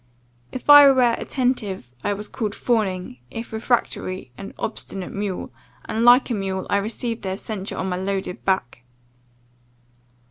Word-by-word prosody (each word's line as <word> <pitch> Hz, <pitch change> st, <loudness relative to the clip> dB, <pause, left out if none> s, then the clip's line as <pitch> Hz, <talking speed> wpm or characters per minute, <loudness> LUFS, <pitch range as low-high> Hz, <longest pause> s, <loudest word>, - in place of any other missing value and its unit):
If 255 Hz, -, -7 dB
I 290 Hz, -1 st, +10 dB
were 250 Hz, -3 st, +4 dB
attentive, 210 Hz, -, -2 dB
I 205 Hz, -, +1 dB
was 210 Hz, +1 st, -6 dB
called 215 Hz, -4 st, -3 dB
fawning, 190 Hz, -, -1 dB
if 225 Hz, -, -7 dB
refractory, 205 Hz, -, -1 dB
an 195 Hz, -, -9 dB
obstinate 195 Hz, -4 st, -5 dB
mule, 200 Hz, -6 st, -4 dB, 0.3 s
and 225 Hz, +1 st, -1 dB
like 245 Hz, +2 st, +6 dB
a -, -, +2 dB
mule 190 Hz, -2 st, -2 dB
I -, -, +4 dB
received 225 Hz, +3 st, -3 dB
their 190 Hz, 0 st, -3 dB
censure 205 Hz, -2 st, -5 dB
on 190 Hz, -, -2 dB
my 180 Hz, -1 st, -2 dB
loaded 190 Hz, -1 st, -3 dB
back. 185 Hz, -11 st, -1 dB
205 Hz, 145 wpm, -23 LUFS, 190-235 Hz, 0.3 s, I